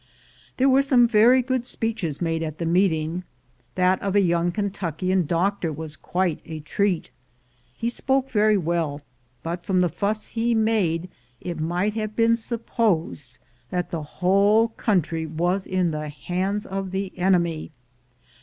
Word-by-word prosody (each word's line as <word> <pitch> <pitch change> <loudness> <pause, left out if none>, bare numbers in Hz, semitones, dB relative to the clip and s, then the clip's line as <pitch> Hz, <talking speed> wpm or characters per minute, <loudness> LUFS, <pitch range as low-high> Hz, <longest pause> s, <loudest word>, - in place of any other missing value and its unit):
There 265 - +3
were 270 0 +5
some 255 -3 +4
very 240 +3 +5
good 260 -1 -1
speeches 220 - -3
made 165 -1 -1
at 155 -1 -4
the 170 - -3
meeting; 170 -1 +1 0.5
that 185 0 +2
of 200 0 -1
a - - +6
young 175 -2 +2
Kentuckian 185 -3 -1
doctor 175 +1 0
was 155 0 -7
quite 175 +1 -1
a 160 -1 -7
treat. 180 +4 -1 0.7
He 230 - -2
spoke 265 +2 0
very 215 -1 +4
well, 165 -4 -1 0.4
but 170 +1 -4
from 190 -3 +1
the 180 -1 +3
fuss 215 +4 -2
he 235 0 0
made 200 -7 +1 0.3
it 170 -3 -5
might 175 +6 0
have 215 -1 -4
been 230 0 +4
supposed 215 - -2 0.3
that 180 0 -2
the 165 -3 -2
whole 200 +8 +3
country 170 -8 -1
was 175 +5 -1
in 185 -2 +1
the 150 0 -4
hands 185 +7 -2
of 195 0 -4
the 190 0 -4
enemy. 175 -4 +1
185 Hz, 150 wpm, -24 LUFS, 165-215 Hz, 0.7 s, a